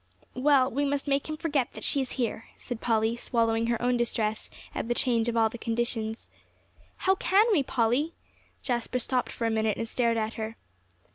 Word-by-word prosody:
"Well, 270 0 +4
we 280 +4 0
must 285 0 -1
make 275 +1 0
him 310 - -3
forget 290 -6 0
that - - -9
she 280 - +1
is 260 - -4
here," 235 -3 -2
said 245 -3 -6
Polly, 225 0 +2
swallowing 230 -1 +1
her 235 -1 0
own 245 0 +2
distress 220 -2 -1 0.2
at - - -3
the 240 - 0
change 235 -2 +2
of 235 - -1
all 225 -1 +5
the 225 +2 -8
conditions. 230 -1 -2 0.7
"How 380 - +3
can 385 +2 +4
we, 355 -9 +4
Polly?" 260 +5 +1 0.5
Jasper 245 0 -1
stopped 250 +1 0
for 230 - -3
a 225 - +2
minute 220 -1 +1
and 230 - -3
stared 230 0 +1
at 220 0 -1
her. 220 +1 -5
240 Hz, 195 wpm, -28 LUFS, 225-270 Hz, 0.7 s, all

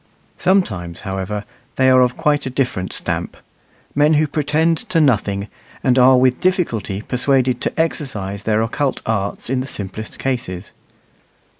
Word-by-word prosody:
Sometimes, 95 - 0
however, 95 +1 -4 0.3
they 130 - +3
are 130 0 +6
of 125 -1 +2
quite 145 -2 +1
a - - -1
different 125 -8 -2
stamp - - -3 0.6
men 150 +2 +4
who 155 +1 +3
pretend 155 +2 +1
to 170 - +2
nothing, 105 -8 +1 0.4
and 130 0 +3
are 130 +1 +7
with 125 0 +3
difficulty 115 - -1
persuaded 130 -1 +1
to - - -2
exercise 110 - -2
their 110 +1 +1
occult 135 +4 -2
arts 100 -3 -2
in 130 +1 0
the 130 - -4
simplest 105 -1 -6
cases. 105 -8 -3
125 Hz, 145 wpm, -19 LUFS, 105-145 Hz, 0.6 s, are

